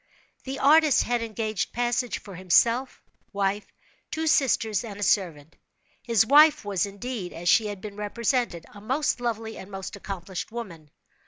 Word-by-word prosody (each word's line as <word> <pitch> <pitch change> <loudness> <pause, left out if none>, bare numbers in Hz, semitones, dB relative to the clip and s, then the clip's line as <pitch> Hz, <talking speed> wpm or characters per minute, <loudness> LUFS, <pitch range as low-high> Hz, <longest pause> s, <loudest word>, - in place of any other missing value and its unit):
The 270 +1 -4
artist 300 +1 +5
had 240 0 -1
engaged 220 -2 -3
passage 245 +1 -1
for 200 - -12
himself, 230 +8 +2 0.3
wife, 200 +1 -1 0.4
two 320 +1 -3
sisters 245 -7 +2
and 205 -3 -8
a - - -2
servant. 165 -7 0 0.5
His 230 -3 +2
wife 300 0 +6
was, 200 0 0
indeed, 200 -1 -6
as 170 +1 -7
she 215 +4 +4
had 205 -2 -6
been 205 -1 -8
represented, 210 -3 -1
a 205 - -12
most 260 +4 -1
lovely, 225 -2 -3
and 190 - -10
most 195 0 -7
accomplished 190 -1 -6
woman. 180 -10 -8
215 Hz, 155 wpm, -26 LUFS, 195-245 Hz, 0.5 s, wife